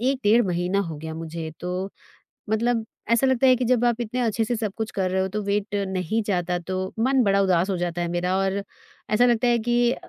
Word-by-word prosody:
1 260 +2 +1
डेढ़ 220 +4 +5
महीना 180 +2 0
हो 160 - -5
गया 160 +1 -6
मुझे, 165 0 -6
तो 180 +2 -3 0.6
मतलब 225 +1 +1 0.3
ऐसा 235 +3 +4
लगता 260 0 +3
है 255 - +7
कि 250 0 -1
जब 245 0 +2
आप 240 -1 +1
इतने 240 +2 -3
अच्छे 225 -1 +1
से 240 - -1
सब 215 -3 -2
कुछ 220 -1 -3
कर 190 -2 -1
रहे 190 0 +1
हो, 190 - 0
तो 210 +3 -3
वेट 205 0 -1
नहीं 190 +3 -1
जाता, 180 -3 0
तो 185 +2 -4
मन 260 +3 +3
बड़ा 200 -2 +3
उदास 185 -1 +2
हो 190 - 0
जाता 175 0 -2
है 175 - -1
मेरा 180 +1 0
और 195 +1 0 0.5
ऐसा 240 +3 +5
लगता 240 0 +2
है 240 -1 +4
कि 240 0 +3
200 Hz, 230 wpm, -24 LUFS, 180-235 Hz, 0.6 s, है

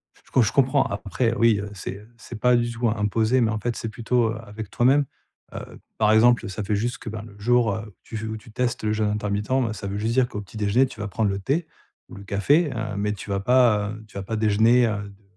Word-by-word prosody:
Je - - -26
co 130 - +4
je 110 - +2
comprends 135 +1 +3
après 110 +4 -1
oui, 115 -3 +3
heu, 105 - -5
c'est, 95 0 -6
heu, 105 +2 -17
c'est 115 0 -9
pas 125 +1 +4
du 120 0 +1
tout 115 0 -1
im 110 - -1
imposé, 110 +4 +1
mais 110 -2 +2
en 110 - -2
fait 120 +2 -2
c'est 115 - -4
plutôt, 115 +1 0
heu, 110 - -5
avec 105 0 -8
toi-même, 135 +6 +3 0.5
heu, - - -9 0.2
par 110 -1 +3
exemple, 120 +1 +5
heu, - - -5
ça 105 +3 -4
fait 105 +1 0
juste 120 +5 -1
que, 115 - -7
ben, 110 0 -6
le 100 -2 -13
jour, 115 -1 +2
heu, 110 0 -6
où 105 - -15
tu - - -9
veux 110 +1 -4
où 110 - -4
tu 110 - -15
testes 120 0 -2
le 105 - +1
jeûne 110 -1 0
intermittent, 105 0 -2
bah 130 -4 +1
ça 100 - -6
veut 100 +1 -3
juste 110 +2 -1
dire 130 0 +3
qu'au 105 - -6
petit 105 +2 -12
déjeuner, 105 +5 +3
tu 115 - -13
vas 105 - -3
prendre 105 +1 0
le 100 0 -2
thé 150 - -1 0.4
ou - - -10
le 100 - -10
café, 140 - +2
hem, 110 -5 -4
mais 105 +1 0
tu 105 0 -9
vas 100 0 0
pas, 110 -2 +3
heu, 110 0 -9
tu 105 - -11
vas 100 - -4
pas 110 +3 -4
déjeuner, 110 +3 +4
heu, 105 -2 -3
de 100 +1 -19
110 Hz, 280 wpm, -24 LUFS, 105-120 Hz, 0.5 s, exemple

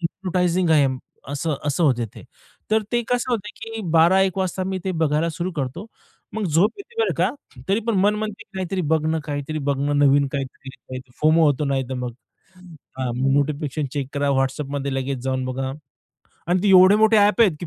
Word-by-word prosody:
Hypnotising 180 0 0
आहे 150 -3 +5 0.4
असं, 145 +2 -2
असं 145 +4 +1
होते 120 -5 +2
ते, - - -11 0.5
तर 220 0 +3
ते 240 - +2
कसं 245 0 0
होत, 225 - +1 0.2
की 225 0 -6
12-1 185 +3 +4
वाजता 185 0 -1
मी 190 0 -2
ते 190 - -1
बघायला 155 +2 +1
सुरू 170 +3 -3
करतो. 145 - -4 0.5
मग 220 - -2
झोप 180 +6 +3
येते 460 +3 -6
बरं - - +1
का 185 +4 +3 0.4
तरी 200 +3 +2
पण 230 - +1
मन 205 +2 +3
म्हणते, 215 0 -4
की - - -61
काहीतरी 185 0 -2
बघणं, 160 0 +1
काहीतरी 145 +1 -4
बघणं, 145 +1 0
नवीन 140 0 +4
काहीतरी 135 -1 -7 0.2
फोमो 155 +2 +5
होतो 145 0 +1
नाही 135 -2 0
तर 130 - -3
मग. 125 -1 -4 0.9
हां, 130 -2 -1 0.2
नोटिफिकेशन 145 0 -1
चेक 140 -3 -3
करा. 140 0 0
WhatsAppमध्ये 140 +1 -2
लगेच 135 0 -2
जाऊन 130 -1 -1
बघा 130 +1 -3 0.8
आणि 180 +2 +2
ते 205 - +2
एवढे 190 +2 +7
मोठे 220 +1 +4
ॲप 210 +2 +4
आहेत, 205 -7 +6
की 175 - -5
160 Hz, 185 wpm, -22 LUFS, 140-190 Hz, 0.9 s, एवढे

